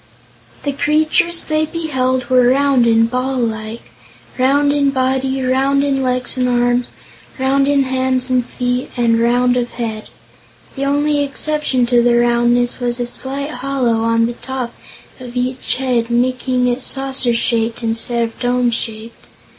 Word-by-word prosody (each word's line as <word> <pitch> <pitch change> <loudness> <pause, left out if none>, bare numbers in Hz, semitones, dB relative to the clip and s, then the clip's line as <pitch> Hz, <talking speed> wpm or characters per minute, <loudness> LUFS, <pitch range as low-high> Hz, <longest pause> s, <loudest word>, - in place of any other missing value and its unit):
The 285 - -1
creatures 310 +4 +1
they 310 0 0
beheld 260 -6 -1
were 255 -1 +4
round 270 -2 +3
and 230 0 +4
ball 255 +2 -2
like; 220 -1 -4 0.5
round 285 +3 +3
in 285 -1 +2
body, 265 0 -1
round 270 +2 +2
in 275 -1 0
legs 255 0 -1
and 250 -1 +1
arms, 245 0 +1 0.5
round 275 +1 +1
in 280 -1 +3
hands 260 -1 -1
and 255 -1 +1
feet 250 +1 -3
and 230 -1 +2
round 245 +1 +2
of 240 -1 -2
head. 220 -2 -5 0.7
The 275 0 -2
only 290 +1 +1
exception 280 -2 0
to 240 0 +3
the 240 0 +3
roundness 240 +1 +2
was 245 0 -2
a 245 - -1
slight 270 +4 -3
hollow 250 -3 -1
on 230 0 +2
the 240 - -2
top 255 -1 -5 0.5
of 250 -1 -8
each 255 +1 -2
head, 245 -3 -1
making 250 +1 0
it 245 +1 0
saucer 265 -2 0
shaped 230 0 0
instead 230 +1 -1
of 230 0 -6
dome 245 -1 +1
shaped. 225 0 -5
255 Hz, 155 wpm, -17 LUFS, 240-270 Hz, 0.7 s, were